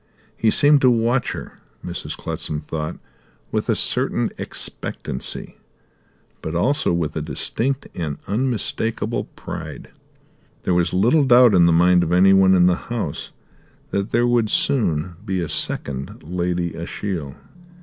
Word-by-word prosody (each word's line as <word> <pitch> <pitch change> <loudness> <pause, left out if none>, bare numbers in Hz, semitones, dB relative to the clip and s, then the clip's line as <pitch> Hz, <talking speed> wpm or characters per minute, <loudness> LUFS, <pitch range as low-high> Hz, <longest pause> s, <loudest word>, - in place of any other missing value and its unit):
He 110 - +2
seemed 145 +4 +4
to 130 - +6
watch 120 +2 +1
her, - - -9 0.3
Mrs. - - -5
Clutsam 75 -1 -3
thought, 75 0 -5 0.5
with - - -2
a - - +3
certain - - 0
expectancy; 65 - -5 0.8
but 80 - -5
also 140 - +1
with 85 -3 -1
a 80 - -2
distinct 130 - -2
and 75 -5 -4
unmistakable 115 0 -1
pride. - - -8 0.7
There 90 - +1
was 90 0 +2
little 120 +11 +3
doubt 125 -3 +6
in 85 -2 +6
the - - +4
mind 90 +2 +5
of 85 -1 -1
anyone 95 +1 +6
in 90 -1 +5
the 90 -1 +3
house 115 -11 -3 0.6
that 100 +2 -1
there 120 +1 +2
would 120 -3 +2
soon 85 - +1
be 95 -1 -2
a 85 - -2
second 70 -2 -1
Lady 85 0 -2
Ashiel. 85 -4 -5
90 Hz, 140 wpm, -21 LUFS, 85-115 Hz, 0.8 s, to